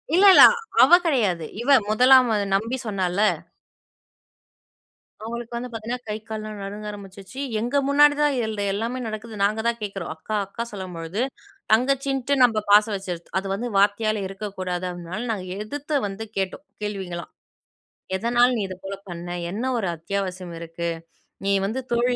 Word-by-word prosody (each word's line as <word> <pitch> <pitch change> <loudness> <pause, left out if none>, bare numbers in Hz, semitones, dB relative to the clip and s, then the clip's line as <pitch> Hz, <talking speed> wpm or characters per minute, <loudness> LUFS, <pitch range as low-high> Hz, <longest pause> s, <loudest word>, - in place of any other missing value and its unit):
இல்ல, 380 +3 +6
இல்ல. - - +10 0.4
அவ - - +5
கிடையாது. 205 - +1 0.2
இவ 275 - -3 0.2
1லாம் 250 +3 +6 0.3
நம்பி 225 +6 -1
சொன்னாள்ல. 195 -1 0 2.0
அவங்களுக்கு 235 +1 -6
வந்து 250 +1 -5
பார்த்தீங்கன்னா, 235 +2 -5
கை 210 - -1
கால்லாம் 215 -1 -6
நடுங்க 205 +2 -7
ஆரம்பிச்சுச்சு. 200 +3 -10 0.2
எங்க 245 +5 0
முன்னாடி 290 +1 +6
தான் 295 -1 +3
இது 240 -3 0
இந்த 210 -2 -3
எல்லாமே 230 +5 -2
நடக்குது. 215 +1 -6
நாங்க 210 +2 +2
தான் 235 0 0
கேட்கிறோம். 195 -5 -5
அக்கா! 215 +7 -5
அக்கா! 215 +4 -5
சொல்லும்பொழுது 185 0 -5 0.5
தங்கச்சின்னுட்டு 270 +3 +2
நம்ப 225 -3 +4
பாசம் 210 +1 +6
வச்சுரது. 180 -3 -5
அது 195 +1 -2
வந்து 235 +5 -3
வார்த்தையால 205 +1 +2
இருக்கக்கூடாது. 190 -2 -4
அதனால 175 +3 -6
நாங்க 190 -4 -4 0.2
எதிர்த்து 290 +6 -4
வந்து 195 +3 -6
கேட்டோம். 190 +7 -2 0.2
கேள்விகலாம். 190 -4 -5 0.8
"எதனால 240 +4 +3
நீ - - -1
இது 185 - -7
போல 195 0 -5
பண்ண? 175 0 -7 0.2
என்ன 245 +7 -2
ஒரு 205 -5 -1
அத்தியாவசியம் 185 +1 -4
இருக்கு? 170 0 -4 0.6
நீ 200 - +2
வந்து 220 +6 -2
தோழி, 240 +1 +2
210 Hz, 145 wpm, -24 LUFS, 190-240 Hz, 2.0 s, இல்ல